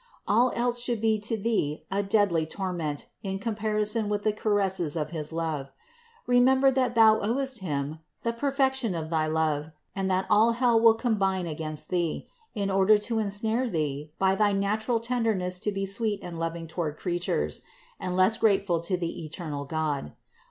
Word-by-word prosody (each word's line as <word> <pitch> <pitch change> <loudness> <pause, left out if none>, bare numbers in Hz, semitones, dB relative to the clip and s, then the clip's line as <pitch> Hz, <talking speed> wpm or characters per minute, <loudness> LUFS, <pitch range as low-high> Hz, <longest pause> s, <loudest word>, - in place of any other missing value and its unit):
All 235 +4 +4
else 245 0 0
should 240 -2 -1
be 220 0 +2
to 215 +2 -2
thee 200 -9 -1
a 200 +1 +1
deadly 195 -6 +2
torment 170 -5 -3 0.2
in 195 -1 -3
comparison 215 0 -1
with 205 0 -1
the 215 - +2
caresses 195 -7 0
of 155 -1 -2
his 155 -2 -5
love. 160 -4 -3 0.6
Remember 260 +2 +5
that 255 -2 0
thou 220 -1 +6
owest 260 +3 -1
Him 150 -3 -3 0.2
the 230 - 0
perfection 265 -4 0
of 160 -1 -4
thy 155 -1 +1
love, 155 -1 0 0.3
and 195 -1 -1
that 185 0 +1
all 220 +2 +4
hell 240 -1 +3
will 225 0 +6
combine 195 -6 0
against 155 -1 -5
thee, 175 -3 -1 0.3
in 200 -2 -1
order 195 +2 +5
to 225 +2 -2
ensnare 220 +4 0
thee 150 -4 -2
by 190 0 +3
thy 205 0 +2
natural 215 +4 0
tenderness 225 -7 -1
to 210 +1 -1
be 195 0 -2
sweet 205 +1 -1
and 170 -2 -6
loving 165 0 -3
toward 160 -2 -4
creatures, 175 - -1 0.4
and 180 -1 -3
less 190 +4 +4
grateful 200 -6 +2
to 175 +3 -1
the 170 -1 -4
eternal 155 -2 -5
God. 145 - -2
195 Hz, 170 wpm, -27 LUFS, 165-225 Hz, 0.6 s, thou